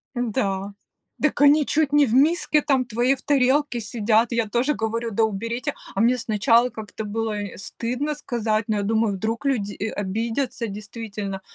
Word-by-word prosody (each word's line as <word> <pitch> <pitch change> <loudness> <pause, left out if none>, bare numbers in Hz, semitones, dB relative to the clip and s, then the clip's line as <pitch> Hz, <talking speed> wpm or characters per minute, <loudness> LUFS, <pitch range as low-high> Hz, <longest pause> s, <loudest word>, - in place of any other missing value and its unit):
Да, 200 -4 -1 0.5
дак 300 - +1
они 290 +1 +6
чуть 295 -1 +1
не 295 -1 +6
в 225 - -2
миске 300 +2 +3
там, 265 -3 +2
в - - -20
твоей 240 +4 +2
в 260 - -16
тарелке 275 -2 +2
сидят! 225 +1 +1
Я 230 -2 +1
тоже 255 +6 +1
говорю: 230 0 -2
"Да 225 +3 +1
уберите!" 230 +7 -2 0.2
А 195 - +1
мне 245 +2 +4
сначала 230 +2 +3
как-то 220 -1 -7
было, 220 +1 -2
э, 205 - -7
стыдно 250 +9 -3
сказать, 225 -6 -1
но 215 - 0
я 205 - -1
думаю, 220 -1 +1
вдруг 225 +7 -3
люди, 210 -7 0
э, - - -3
обидятся 225 +5 -2
действительно. 205 -1 -6
230 Hz, 175 wpm, -23 LUFS, 215-260 Hz, 0.5 s, они